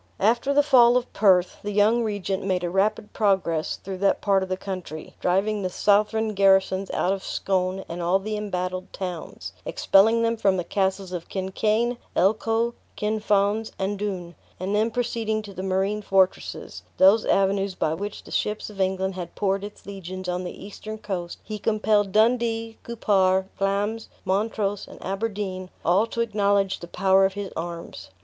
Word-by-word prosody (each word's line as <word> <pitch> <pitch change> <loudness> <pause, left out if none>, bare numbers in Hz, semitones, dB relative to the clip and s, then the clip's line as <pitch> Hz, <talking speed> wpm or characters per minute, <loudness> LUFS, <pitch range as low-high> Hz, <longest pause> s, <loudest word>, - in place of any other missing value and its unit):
After 235 +6 +2
the 290 +1 +4
fall 250 -4 +6
of 250 - -3
Perth, 185 -3 +3
the 205 - -4
young 210 +3 +3
regent 200 -2 -2
made 185 -2 0
a 175 - -2
rapid 205 +2 0
progress 190 -7 +1
through 190 -1 -7
that 200 0 +2
part 195 -2 +2
of 190 - -4
the 185 - -1
country; 185 -5 -7
driving 200 +4 +1
the 185 - -1
southron 210 +3 +2
garrisons 195 -1 +3
out 185 - +1
of 195 - -5
Scone, 190 0 -1
and 170 +1 -5
all 175 +3 +3
the 210 +2 -4
embattled 185 -3 -3
towns; 165 - -6
expelling 225 - +4
them 230 0 +1
from 195 -3 +2
the 180 - -1
castles 190 +1 -1
of 175 -2 -6
Kincain, 215 +5 0 0.2
Elcho, 225 +4 +2 0.2
Kinfauns, 210 0 +1
and 195 +1 -2
Doune; 185 -4 -4 0.3
and 190 +3 -2
then 215 +2 +2
proceeding 225 -2 -1
to 200 -1 -10
the 185 - -6
marine 195 +2 0
fortresses 190 -2 0 0.2
(those 195 +4 +6
avenues 195 0 +1
by 155 - 0
which 205 +5 -5
the - - -13
ships 210 0 -2
of 195 -2 -5
England 190 0 0
had 180 -2 -7
poured 195 -1 0
its 205 0 -9
legions 185 -1 -7
on 180 0 -2
the 180 - -7
eastern 215 +2 -8
coast), 185 -5 -5
he 215 0 -6
compelled 210 -2 +1
Dundee, 225 +1 +1
Cupar, 190 -5 +2
Glamis, 205 +3 -1 0.2
Montrose, 205 0 -1
and - - -12
Aberdeen, 195 -2 -3 0.2
all 190 +6 +3
to 235 - -2
acknowledge 200 -3 +1
the 170 - -8
power 190 +2 +3
of 190 0 +2
his 200 -1 -5
arms. 170 0 -6
195 Hz, 170 wpm, -25 LUFS, 185-215 Hz, 0.3 s, fall